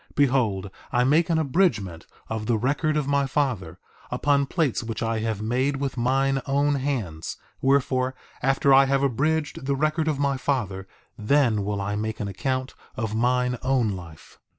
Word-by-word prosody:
Behold, 115 Hz, -9 st, +1 dB, 0.2 s
I 120 Hz, -, +3 dB
make 155 Hz, +7 st, +3 dB
an 165 Hz, -, +2 dB
abridgment 130 Hz, -, 0 dB, 0.2 s
of 110 Hz, -1 st, -4 dB
the 115 Hz, -, +2 dB
record 145 Hz, +6 st, 0 dB
of 150 Hz, -, 0 dB
my 140 Hz, -1 st, +2 dB
father, 120 Hz, -, -1 dB, 0.3 s
upon 140 Hz, -1 st, +1 dB
plates 155 Hz, -5 st, 0 dB
which 115 Hz, -1 st, -4 dB
I 115 Hz, -1 st, 0 dB
have 110 Hz, -1 st, -2 dB
made 130 Hz, +5 st, 0 dB
with 135 Hz, -1 st, -3 dB
mine 135 Hz, +2 st, +1 dB
own 140 Hz, +1 st, +2 dB
hands; 120 Hz, -, -3 dB, 0.2 s
wherefore, 130 Hz, -1 st, +2 dB, 0.3 s
after 135 Hz, +1 st, +3 dB
I 135 Hz, +1 st, +7 dB
have 135 Hz, 0 st, +1 dB
abridged 145 Hz, +2 st, 0 dB
the 140 Hz, -, +1 dB
record 155 Hz, +3 st, 0 dB
of 155 Hz, -3 st, +1 dB
my 140 Hz, -1 st, +1 dB
father 100 Hz, -9 st, -2 dB, 0.3 s
then 110 Hz, -2 st, +2 dB
will 100 Hz, 0 st, -2 dB
I 100 Hz, +1 st, -2 dB
make 110 Hz, +1 st, -3 dB
an 105 Hz, -, -2 dB
account 130 Hz, +6 st, -2 dB, 0.2 s
of 110 Hz, -2 st, -3 dB
mine 125 Hz, +1 st, +1 dB
own 130 Hz, -4 st, +1 dB
life. 85 Hz, -5 st, -9 dB
130 Hz, 170 wpm, -25 LUFS, 110-140 Hz, 0.3 s, I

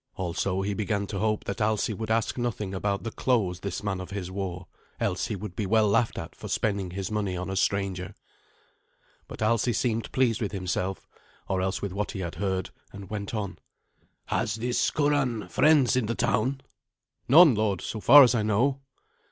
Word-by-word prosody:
Also 95 Hz, +1 st, -1 dB
he 100 Hz, +1 st, -1 dB
began 105 Hz, 0 st, -1 dB
to 100 Hz, -1 st, -5 dB
hope 110 Hz, 0 st, 0 dB
that 100 Hz, -, -5 dB
Alsi 110 Hz, +1 st, +1 dB
would 110 Hz, +2 st, -5 dB
ask 115 Hz, 0 st, +1 dB
nothing 110 Hz, -5 st, -3 dB
about 100 Hz, +1 st, -1 dB
the 115 Hz, -, -4 dB
clothes 105 Hz, -10 st, 0 dB
this 100 Hz, +1 st, -5 dB
man 95 Hz, -2 st, -2 dB
of 90 Hz, -, -8 dB
his 95 Hz, -2 st, -5 dB
wore, 95 Hz, -2 st, -4 dB, 0.3 s
else 90 Hz, -, -1 dB
he 110 Hz, -, -3 dB
would 100 Hz, -2 st, -7 dB
be 105 Hz, -1 st, -2 dB
well 110 Hz, +1 st, +4 dB
laughed 110 Hz, +3 st, +1 dB
at -, -, -6 dB
for -, -, -8 dB
spending 100 Hz, -4 st, -1 dB
his 95 Hz, +3 st, -5 dB
money 100 Hz, -4 st, -1 dB
on 90 Hz, +2 st, -4 dB
a -, -, -3 dB
stranger. 95 Hz, -2 st, -1 dB, 1.1 s
But -, -, -5 dB
Alsi 115 Hz, +2 st, +2 dB
seemed 115 Hz, 0 st, -1 dB
pleased 120 Hz, -4 st, +1 dB
with 105 Hz, -1 st, -2 dB
himself, 95 Hz, 0 st, -3 dB, 0.4 s
or 95 Hz, -1 st, 0 dB
else 95 Hz, +1 st, -2 dB
with 100 Hz, -2 st, -3 dB
what 105 Hz, +1 st, -3 dB
he 95 Hz, -, -4 dB
had 85 Hz, -2 st, -4 dB
heard, 95 Hz, -2 st, -1 dB, 0.2 s
and 100 Hz, 0 st, -10 dB
went 105 Hz, +1 st, -4 dB
on. 100 Hz, -3 st, -4 dB, 0.7 s
"Has 105 Hz, -, -1 dB
this 120 Hz, +2 st, 0 dB
Curan 145 Hz, -7 st, 0 dB
friends 150 Hz, -5 st, +4 dB
in 125 Hz, -4 st, +1 dB
the 115 Hz, -, -1 dB
town?" 130 Hz, +3 st, 0 dB, 0.7 s
"None, 155 Hz, +2 st, +8 dB
lord, 105 Hz, -3 st, 0 dB
so 110 Hz, -, -5 dB
far 140 Hz, +6 st, +9 dB
as 125 Hz, -, +4 dB
I 115 Hz, -, +1 dB
know." 120 Hz, +6 st, +1 dB
105 Hz, 195 wpm, -27 LUFS, 95-115 Hz, 1.1 s, far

